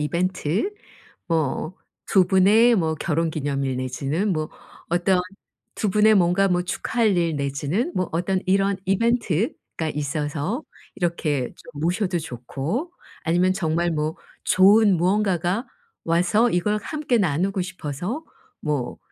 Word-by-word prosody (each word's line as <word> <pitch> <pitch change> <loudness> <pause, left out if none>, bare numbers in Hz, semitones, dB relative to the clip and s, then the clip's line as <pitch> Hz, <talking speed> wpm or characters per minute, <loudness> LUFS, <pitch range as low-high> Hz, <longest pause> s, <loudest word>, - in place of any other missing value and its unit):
이벤트 180 - -1 0.5
뭐 160 +2 -1 0.3
2 190 -3 +5
분의 210 +6 +5
뭐 160 -5 0
결혼기념일 145 -5 -1
내지는 140 +10 -1
뭐 155 -1 -2 0.4
어떤 180 +2 +2 0.6
2 210 - 0
분의 215 +2 +5
뭔가 185 +2 +3
뭐 180 0 +1
축하할 215 +3 0
일 165 -3 +1
내지는 145 - -1
뭐 185 - 0
어떤 180 +3 0
이런 195 +1 +2
이벤트가 200 -5 0
있어서 150 - -2 0.3
이렇게 155 -7 -1
좀 150 -3 -12
모셔도 180 +2 0
좋고 155 - -4 0.3
아니면 175 +3 +2
정말 170 -2 0
뭐 155 0 -2 0.3
좋은 200 +1 +5
무언가가 190 +3 +1 0.3
와서 180 +8 +2
이걸 210 +4 +1
함께 300 -5 -1
나누고 190 +1 0
싶어서 180 - -5 0.4
뭐 145 -5 -2
175 Hz, 240 characters per minute, -23 LUFS, 155-200 Hz, 0.6 s, 2